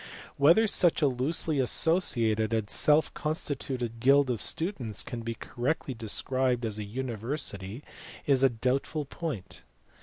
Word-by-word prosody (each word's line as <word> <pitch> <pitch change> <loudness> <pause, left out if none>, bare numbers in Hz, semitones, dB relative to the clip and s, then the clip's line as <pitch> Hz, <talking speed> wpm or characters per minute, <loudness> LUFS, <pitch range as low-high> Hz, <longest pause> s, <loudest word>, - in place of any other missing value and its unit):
Whether 165 +11 +5
such 175 -6 +3
a - - +5
loosely 140 +4 0
associated 115 - +2
and 110 -2 0
self 150 +1 +3
constituted 135 -6 -3
guild 135 +2 +4
of 115 - -3
students 140 - -1
can 120 - -6
be 115 0 -4
correctly 130 +5 -3
de 115 -2 -7
scribed 130 0 0
as 110 -1 -3
a - - -3
university 115 -1 -4 0.4
is 135 -2 +3
a 135 - +5
doubtful 130 +6 -2
point. 140 - -6
130 Hz, 140 wpm, -28 LUFS, 115-150 Hz, 0.4 s, Whether